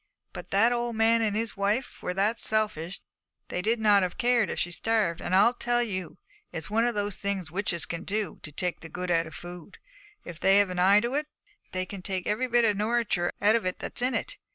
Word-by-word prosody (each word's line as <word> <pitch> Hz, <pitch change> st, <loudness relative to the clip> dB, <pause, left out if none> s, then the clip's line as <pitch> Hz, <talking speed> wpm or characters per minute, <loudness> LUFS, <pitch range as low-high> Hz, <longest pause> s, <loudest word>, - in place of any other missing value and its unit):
But -, -, -8 dB
that 220 Hz, +5 st, +4 dB
old 240 Hz, -1 st, -1 dB
man 225 Hz, +1 st, +4 dB
and 210 Hz, -2 st, 0 dB
his 225 Hz, +1 st, -1 dB
wife 205 Hz, +6 st, -1 dB
were 180 Hz, -, -3 dB
that 210 Hz, +4 st, +1 dB
selfish 205 Hz, -5 st, -1 dB, 0.5 s
they'd 220 Hz, +6 st, 0 dB
not 205 Hz, -2 st, +5 dB
have 185 Hz, -2 st, -2 dB
cared 240 Hz, -3 st, +2 dB
if -, -, -4 dB
she'd 175 Hz, -, -1 dB
starved. 210 Hz, -3 st, 0 dB
And 185 Hz, -, 0 dB
I 210 Hz, +5 st, +6 dB
tell 240 Hz, 0 st, +2 dB
you, 185 Hz, -7 st, -5 dB, 0.3 s
it's 165 Hz, +5 st, -5 dB
one 225 Hz, +2 st, +3 dB
of 240 Hz, -, -1 dB
the 205 Hz, 0 st, -1 dB
things 195 Hz, -4 st, -3 dB
witches 180 Hz, -3 st, -1 dB
can 170 Hz, -, -5 dB
do, 205 Hz, -4 st, -3 dB
to 150 Hz, -, -8 dB
take 180 Hz, +4 st, -3 dB
the 165 Hz, -, -10 dB
good 180 Hz, +2 st, -4 dB
out 165 Hz, -1 st, +2 dB
of 160 Hz, -, -10 dB
food, 175 Hz, +2 st, -10 dB, 0.5 s
if 170 Hz, -1 st, -8 dB
they've 200 Hz, +1 st, +5 dB
an 180 Hz, -, -3 dB
eye 195 Hz, +3 st, +6 dB
to 240 Hz, +3 st, -2 dB
it; 300 Hz, +1 st, -1 dB, 0.4 s
they 185 Hz, 0 st, -1 dB
can 195 Hz, 0 st, -8 dB
take 185 Hz, -1 st, -3 dB
every 215 Hz, +5 st, 0 dB
bit 240 Hz, -1 st, +3 dB
of 210 Hz, -3 st, +2 dB
nouriture 215 Hz, -5 st, 0 dB
out 210 Hz, +2 st, +5 dB
of 230 Hz, -, +1 dB
it 185 Hz, 0 st, -2 dB
that's -, -, -4 dB
in 250 Hz, +1 st, +1 dB
it. -, -, -3 dB
205 Hz, 225 wpm, -27 LUFS, 180-225 Hz, 0.5 s, I